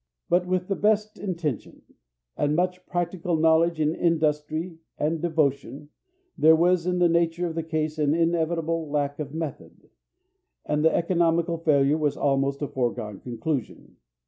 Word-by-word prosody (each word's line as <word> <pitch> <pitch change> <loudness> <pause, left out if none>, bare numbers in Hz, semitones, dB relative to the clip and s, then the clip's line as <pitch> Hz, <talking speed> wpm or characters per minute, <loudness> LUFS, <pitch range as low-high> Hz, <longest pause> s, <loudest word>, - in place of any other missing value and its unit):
But 180 +1 +2
with 180 0 -1
the 195 - -1
best 215 +1 0
intention, 170 - -4 0.5
and 150 +1 0
much 180 +1 -1
practical 175 -1 -2
knowledge 160 +1 +3
and 155 +1 +1
industry 160 0 -1 0.2
and 155 +1 -1
devotion, 145 -3 -1 0.5
there 160 +1 +6
was 175 +1 +2
in 180 0 +1
the 175 -1 +4
nature 170 +1 +1
of 165 - -3
the 165 - -2
case 155 -1 -3
an 150 0 +2
inevitable 165 -1 0
lack 145 0 -1
of 145 -2 -5
method, 160 -3 -7 0.7
and 150 0 0
the 160 - +5
economical 170 -1 +1
failure 150 -2 +2
was 150 -2 0
almost 140 0 0
a - - -1
foregone 115 -6 -3
conclusion. 125 +3 -5
160 Hz, 145 wpm, -25 LUFS, 150-170 Hz, 0.7 s, there